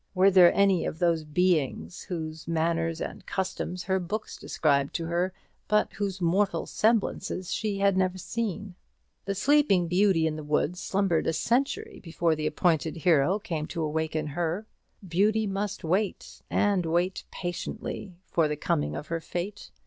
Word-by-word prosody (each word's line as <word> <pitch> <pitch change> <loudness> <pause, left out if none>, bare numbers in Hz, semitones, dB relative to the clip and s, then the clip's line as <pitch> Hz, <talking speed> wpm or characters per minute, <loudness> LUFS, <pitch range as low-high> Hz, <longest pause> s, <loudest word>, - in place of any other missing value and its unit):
Were 190 +2 +5
there 180 -2 +8
any 195 -3 +4
of - - -3
those 170 -2 +2
Beings 150 - 0
whose 160 -2 -5
manners 165 0 0
and - - -6
customs 185 -1 -3
her 190 0 +1
books 210 +5 -4
described 140 -3 0
to 165 - -1
her, 175 +3 0 0.4
but 210 0 +2
whose 195 -2 -3
mortal 190 +3 +1
semblances 210 -4 0
she 210 -2 -1
had 200 -1 +3
never 185 0 +1
seen? 205 -1 -4 0.5
The 200 - -2
Sleeping 235 - +3
Beauty 180 -2 +3
in 155 -1 -1
the 155 - -6
woods 150 +4 0
slumbered 190 -5 0
a - - +2
century 280 - 0
before 165 -1 0
the 155 0 -2
appointed 160 0 +1
hero 165 +2 +3
came 165 -8 -4
to 165 - -3
awaken 155 0 -1
her. 170 +6 -2 0.4
Beauty 210 +5 +2
must 200 0 -3
wait, 185 +5 -1
and 200 -3 +2
wait 175 +3 0
patiently, 175 +1 -5
for 165 -2 +1
the 150 0 -3
coming 75 - -1
of 145 - -5
her 165 0 -1
fate. 180 +5 -5
180 Hz, 155 wpm, -27 LUFS, 160-195 Hz, 0.5 s, there